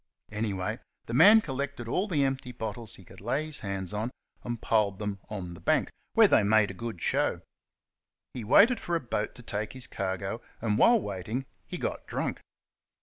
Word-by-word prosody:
Anyway, 105 -3 -2 0.3
the 115 - -6
man 205 - +8
collected 140 - -4
all 185 - 0
the 155 -8 +1
empty 135 -2 -1
bottles 110 -2 -5
he 95 - -15
could - - -14
lay 135 +8 -1
his 155 -1 -5
hands 100 -1 -4
on, 110 +3 -1 0.3
and 120 -1 -4
piled 105 -4 +2
them 105 -1 -3
on 95 -5 -5
the 85 - -11
bank, - - +1 0.2
where - - +7
they - - +5
made 105 0 +4
a - - -8
good 110 0 -6
show. - - +1 0.9
He 125 - -5
waited 215 - +6
for 175 - -2
a - - +2
boat 110 -6 -3
to 120 - -11
take 105 -1 -3
his 130 -1 -3
cargo, 100 0 -3 0.2
and, 105 -2 0
while 235 -1 +6
waiting, 105 - -4 0.2
he - - -5
got - - -4
drunk. - - -3
115 Hz, 190 wpm, -29 LUFS, 100-135 Hz, 0.9 s, man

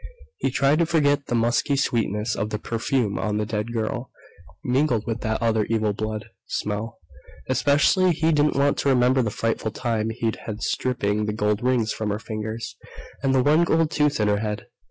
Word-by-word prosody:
He - - +1
tried 140 +4 +2
to 170 - +3
forget 145 -4 +2
the 120 - 0
musky 120 +4 +2
sweetness 110 -5 0
of 105 +2 -2
the 105 - -2
perfume 115 0 -1
on 105 0 -1
the 105 - 0
dead 105 +1 -3
girl, 120 +2 -3 0.5
mingled 125 -3 +1
with 115 0 -3
that 110 0 -1
other 110 -2 +2
evil 110 -2 0
blood 110 +1 -4 0.2
smell. 105 +2 -3 0.5
Especially 145 +8 +3
he 160 0 +1
didn't 150 -1 +2
want 140 +1 +2
to 140 - +1
remember 130 0 +4
the 115 - 0
frightful 115 +1 -1
time 115 -1 -2
he'd 115 0 -2
had 110 -1 -5
stripping 105 -4 0
the 105 - -1
gold 105 -1 0
rings 120 -3 +1
from 110 -1 -3
her 105 - -1
fingers, 110 +1 -5 0.4
and 135 -1 +2
the 130 - +4
one 155 +4 +4
gold 165 -2 +2
tooth 150 -4 +1
in 105 - +2
her 105 0 +2
head.... 105 -1 -3
115 Hz, 190 wpm, -24 LUFS, 110-135 Hz, 0.5 s, remember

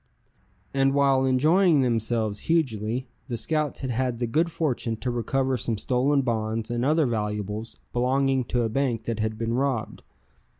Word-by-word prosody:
And 135 0 +2
while 135 -2 +3
enjoying 155 +5 +4
themselves 115 -3 0
hugely, 125 -6 0 0.2
the 120 -3 -3
scouts 155 +3 -2
had 130 -2 -2
had 125 0 -1
the 120 - -1
good 160 +8 +1
fortune 125 -8 -1
to 125 +3 -2
recover 130 +2 0
some 115 -2 -2
stolen 135 +5 +1
bonds 110 -1 -2
and 120 0 -1
other 155 +3 +3
valuables 105 -1 -3 0.2
belonging 130 +1 +1
to 120 0 0
a - - +1
bank 120 -2 0
that 115 0 -3
had 110 0 -1
been 115 +1 -2
robbed. 130 -3 -1
125 Hz, 160 wpm, -26 LUFS, 115-135 Hz, 0.2 s, enjoying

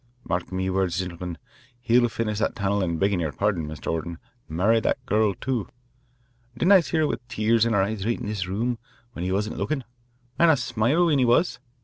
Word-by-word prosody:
Mark 90 +1 -2
me 95 0 -1
wurds, 95 -2 0
gintlemen, 90 -2 -5 0.4
he'll 120 0 +3
finish 105 -2 -2
that 110 - 0
tunnel 100 -2 0
an' 85 -2 -1
beggin' 100 +1 +1
yer 80 -3 -1
pardon, 95 -3 -1
Mr. 75 -1 -4
Orton, 80 +1 -3 0.3
marry 100 +8 +3
that - - -1
gurl, 105 -2 +2
too. 120 0 -2 0.9
Didn't 175 +9 +3
I 195 - +9
see 160 -1 -2
her 155 - +3
with 120 - -4
tears 115 +1 +2
in 115 - 0
her 100 -2 +3
eyes 100 0 -3
right 115 +3 -1
in 125 - -5
this 105 -3 -3
room 115 +5 -1 0.3
when 85 - -5
he 90 - -1
wasn't 105 +3 -1
lookin', 145 -4 -1 0.6
and 170 - +6
a 155 - +5
smile 125 +7 +1
when 150 -5 +3
he 130 - +4
was? 120 +9 +2
105 Hz, 210 wpm, -25 LUFS, 95-120 Hz, 0.9 s, I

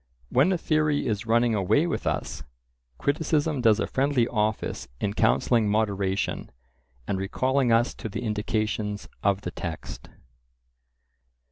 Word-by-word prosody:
When 140 +9 +3
a 185 - +2
theory 155 -2 +1
is 110 0 -2
running 115 +1 +3
away 105 - +2
with 175 - -2
us, 70 - -2 0.6
criticism 150 - 0
does 110 -2 +4
a - - +1
friendly 135 -3 +1
office 110 -2 -1
in 100 -1 -1
counselling 105 - +2
moderation, 100 -2 -1 0.6
and 95 - -1
recalling 130 +6 +1
us 115 +2 +3
to 110 - -4
the 105 - -5
indications 105 -1 -2
of 100 0 +1
the - - -5
text. 85 -4 -7
110 Hz, 130 wpm, -26 LUFS, 100-130 Hz, 0.6 s, does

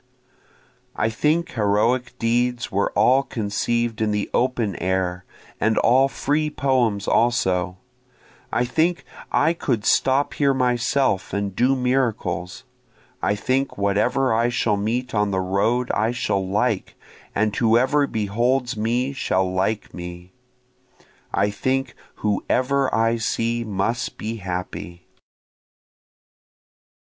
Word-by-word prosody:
I 110 +1 0
think 155 +8 0
heroic 115 +3 +1
deeds 120 +1 0
were 100 +1 0
all 130 +2 +4
conceiv'd 115 0 -2
in 110 - +2
the 105 -1 -2
open 120 -6 0
air, 95 -1 -1 0.3
and 110 +1 +1
all 130 +3 +4
free 150 +3 -1
poems 125 -8 0
also, 95 -6 +1 0.7
I 125 - +1
think 165 +7 0 0.3
I 160 +3 +3
could 120 -10 -2
stop 135 +2 +2
here 140 -2 +2
myself 125 -4 +1
and 100 -1 -2
do 130 +3 +3
miracles, 120 -8 -1 0.6
I 105 - +1
think 130 +6 -1
whatever 110 +6 +1
I 115 +2 +2
shall 115 -3 +1
meet 115 +5 -2
on 105 -1 +1
the 95 -1 0
road 100 +7 0
I 110 +1 +1
shall 120 -5 -1
like, 100 +2 -1 0.4
and 105 0 +1
whoever 130 +5 +3
beholds 120 +4 0
me 120 +5 0
shall 95 -8 0
like 95 +3 -1
me, 90 +1 -9 1.0
I 100 +2 +1
think 130 +6 -1 0.2
whoever 130 +6 0
I 115 +1 +2
see 115 +1 -1
must 115 +4 -2
be 115 +2 -4
happy. 90 -2 -6
115 Hz, 115 wpm, -22 LUFS, 100-130 Hz, 1.0 s, all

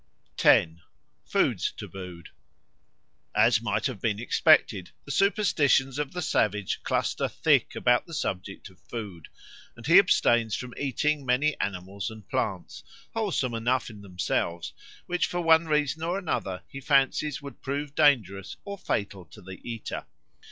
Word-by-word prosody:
10. 80 +1 +4 0.4
Foods - - +1
tabooed 90 -3 -9 1.1
AS - - +4
MIGHT - - -1
have 95 - -3
been 105 -3 0
expected, 95 -5 +3 0.2
the 140 - -6
superstitions 145 -8 +2
of 145 -2 -2
the 180 -1 -4
savage 105 -8 0
cluster - - 0
thick - - +2
about 120 0 +2
the 165 - -10
subject 95 -5 -4
of 90 - -23
food; 100 -9 -8 0.5
and 120 0 -12
he 170 +7 +8
abstains 120 - +3
from 125 -1 -6
eating 145 +2 -1
many 135 +4 +1
animals 100 +2 -3
and 110 -2 -12
plants, - - -3 0.3
wholesome 195 - -1
enough 120 +2 0
in 105 -2 -12
themselves, 90 -2 -2 0.3
which 180 0 0
for 175 - -3
one 165 0 +5
reason 150 -1 0
or 170 +3 -1
another 100 - -3
he 135 - -9
fancies 140 +1 +2
would 140 -4 -11
prove 140 +1 -4
dangerous 110 - +2
or 200 -1 -6
fatal 100 - -3
to 95 - -15
the 95 -1 -10
eater. 115 -2 -6
125 Hz, 145 wpm, -27 LUFS, 100-150 Hz, 1.1 s, he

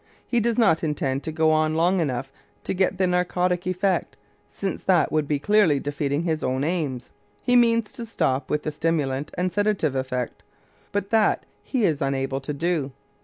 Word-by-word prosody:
He 240 - +1
does 235 +1 0
not 195 -10 +3
intend 140 -3 -1
to 160 - -2
go 160 0 +2
on 155 0 +2
long 175 +3 +3
enough 135 -4 -2 0.3
to - - -2
get 190 0 +1
the 190 - +2
narcotic 180 0 0
effect, 185 +1 0 0.3
since 195 -1 -4
that 180 -4 +3
would 155 -2 +1
be 150 - +1
clearly 180 -2 +3
defeating 145 +1 -2
his 160 -2 -1
own 130 +1 0
aims; 150 -7 -2 0.3
he 245 - +2
means 230 -2 +3
to 240 -3 -6
stop 135 -10 -1
with 150 0 0
the 155 - -2
stimulant 150 -3 -1
and 180 0 0
sedative 205 -6 +1
effect, 130 -2 -3 0.5
but 200 -1 -2
that 220 -2 +3 0.2
he 255 -4 -1
is 155 -5 0
unable 135 0 -1
to 135 - -5
do. 150 -1 -1
160 Hz, 180 wpm, -24 LUFS, 140-190 Hz, 0.5 s, not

